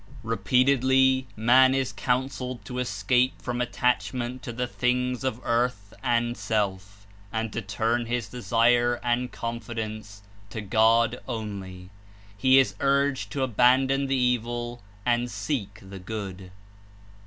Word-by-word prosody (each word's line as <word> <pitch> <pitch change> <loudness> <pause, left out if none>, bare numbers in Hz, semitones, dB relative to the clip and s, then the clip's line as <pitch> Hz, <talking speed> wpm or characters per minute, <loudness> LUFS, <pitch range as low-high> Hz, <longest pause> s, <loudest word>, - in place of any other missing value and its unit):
Repeatedly 130 +4 +3
man 130 +4 +5
is 135 -2 0
counseled 125 -2 -2
to 125 +4 -5
escape 125 0 +1
from 125 -1 -3
at 125 -1 -2
tachment 125 0 -1
to 120 - -6
the 125 +2 -2
things 125 +1 -1
of 130 -3 -2
earth 115 -4 -1
and 120 -2 +1
self, 100 -1 -3 0.3
and 110 -1 -3
to 115 - -2
turn 115 +4 -1
his 120 -2 -2
desire 120 0 +2
and 125 +1 0
confidence 110 -3 -6 0.3
to 110 - -6
God 110 +3 +3
only. 100 -6 -6 0.4
He 130 +6 +4
is 135 - +4
urged 140 0 +1
to 135 - -1
abandon 130 +3 +3
the 135 - +1
evil 120 -1 -1 0.2
and 120 0 +1
seek 105 -1 -3
the 95 0 -9
good. 95 -1 -6
120 Hz, 130 wpm, -26 LUFS, 110-125 Hz, 0.4 s, man